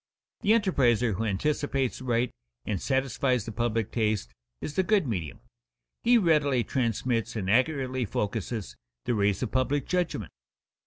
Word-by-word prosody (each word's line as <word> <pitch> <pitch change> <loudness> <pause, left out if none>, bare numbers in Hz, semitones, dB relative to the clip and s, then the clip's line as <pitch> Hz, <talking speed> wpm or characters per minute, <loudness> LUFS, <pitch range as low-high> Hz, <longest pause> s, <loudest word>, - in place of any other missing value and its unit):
_ - - -65
The 210 - +5
enterpriser 125 - +3
who 110 +4 -2
anticipates 135 +5 -1
aright 120 -1 0 0.3
and 100 -4 -2
satisfies 130 -3 0
the 115 - -5
public 115 -1 -1
taste 105 - -1 0.3
is 150 - -5
the 190 - +2
good 195 -1 +2
medium. 90 - -4 0.6
He 240 +1 +5
readily 150 - +3
transmits 115 -3 -1
and 100 -4 -2
accurately 130 +2 +1
focuses 105 - -3 0.3
the - - +1
rays 100 0 +1
of 120 - -3
public 135 +2 +1
judgment. 175 - -1
125 Hz, 145 wpm, -28 LUFS, 110-140 Hz, 0.6 s, The